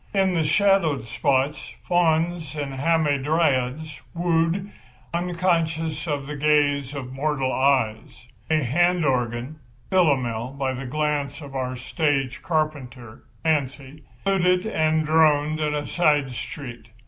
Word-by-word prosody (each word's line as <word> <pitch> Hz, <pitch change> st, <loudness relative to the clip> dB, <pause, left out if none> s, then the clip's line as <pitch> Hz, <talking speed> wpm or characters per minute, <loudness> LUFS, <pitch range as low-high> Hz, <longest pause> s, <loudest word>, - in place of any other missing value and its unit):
In 190 Hz, -1 st, +3 dB
the 165 Hz, -2 st, +1 dB
shadowed 165 Hz, -, +2 dB
spots 135 Hz, +5 st, -1 dB
fauns 165 Hz, -2 st, +1 dB
and 145 Hz, -2 st, -4 dB
hamadryads 145 Hz, -1 st, 0 dB
wooed, 170 Hz, +3 st, 0 dB, 0.4 s
unconscious 165 Hz, -3 st, -1 dB
of 145 Hz, -3 st, -2 dB
the 150 Hz, +1 st, -6 dB
gaze 145 Hz, -1 st, +1 dB
of 130 Hz, -2 st, -6 dB
mortal 135 Hz, -1 st, -1 dB
eyes. 130 Hz, -3 st, 0 dB, 0.2 s
A 155 Hz, -1 st, +2 dB
hand 175 Hz, +6 st, +2 dB
organ—Philomel 125 Hz, 0 st, -1 dB
by 135 Hz, -1 st, -1 dB
the 130 Hz, +1 st, -6 dB
grace 145 Hz, 0 st, -1 dB
of 140 Hz, -2 st, -10 dB
our 130 Hz, -1 st, -2 dB
stage 135 Hz, -1 st, -1 dB
carpenter, 135 Hz, -8 st, -3 dB, 0.2 s
Fancy—fluted 155 Hz, +6 st, -1 dB
and 160 Hz, -6 st, +1 dB
droned 155 Hz, -1 st, +3 dB
in 150 Hz, -1 st, 0 dB
a 145 Hz, 0 st, -2 dB
side 150 Hz, -6 st, +2 dB
street. 125 Hz, -4 st, -8 dB
150 Hz, 110 wpm, -24 LUFS, 130-160 Hz, 0.4 s, In